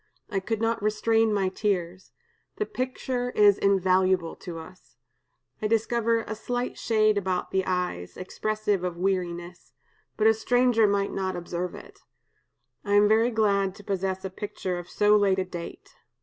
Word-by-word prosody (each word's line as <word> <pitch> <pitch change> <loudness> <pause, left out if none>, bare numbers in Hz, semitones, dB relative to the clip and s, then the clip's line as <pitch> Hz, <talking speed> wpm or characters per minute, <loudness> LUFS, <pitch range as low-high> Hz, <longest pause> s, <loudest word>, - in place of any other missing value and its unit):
I 195 - 0
could 215 +3 -3
not 225 0 0
restrain 220 +1 +2
my 195 -2 +1
tears. 185 -2 -2 0.4
The 425 - -1
picture 255 -3 -3
is 205 -1 +5
invaluable 185 -3 +2
to 175 -3 -8
us. 160 -5 -13 0.6
I 215 - +1
discover 230 +1 +1
a 215 - -5
slight 245 +3 -3
shade 215 -2 +2
about 185 -2 -2
the 190 0 +1
eyes, 180 - -2
expressive 210 +1 -2
of 180 -1 -3
weariness; 175 -2 -3 0.4
but 215 - +1
a 220 - +7
stranger 240 0 +3
might 200 0 0
not 190 -1 -2
observe 175 0 -4
it. - - -13 0.8
I 205 - -1
am 205 0 +6
very 220 +3 +4
glad 200 -4 +1
to 205 - -13
possess 190 -1 -2
a 190 - -4
picture 185 -2 -4
of 175 - -10
so 210 0 +4
late 200 -2 +3
a 190 - 0
date. 175 -2 -9
200 Hz, 160 wpm, -26 LUFS, 185-220 Hz, 0.8 s, a